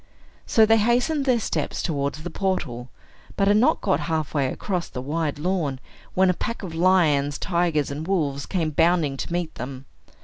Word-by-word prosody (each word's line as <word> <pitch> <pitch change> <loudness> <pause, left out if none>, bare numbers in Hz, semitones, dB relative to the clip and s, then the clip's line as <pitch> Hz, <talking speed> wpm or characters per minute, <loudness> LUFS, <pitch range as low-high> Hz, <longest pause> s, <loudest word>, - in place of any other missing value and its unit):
So 220 - +5
they 225 +1 +5
hastened 250 +7 +1
their 250 -3 +3
steps - - -2
towards 145 -2 -2
the 175 - -5
portal, 130 -11 -2 0.5
but 195 - +2
had 205 +1 +5
not 235 - +3
got 190 - +1
half 160 -3 -2
way 140 -3 +1
across 180 -4 -3
the - - -6
wide 150 +3 -2
lawn, 155 -5 -1 0.4
when 190 0 +4
a - - -1
pack 230 +5 -4
of 175 -4 -6
lions, 160 -5 +3
tigers, 170 -6 0
and 150 +4 -5
wolves 145 -8 -1
came 165 -5 -1
bounding 160 -2 +2
to - - -5
meet 175 -2 -2
them. 130 +1 -7
165 Hz, 180 wpm, -24 LUFS, 145-190 Hz, 0.5 s, So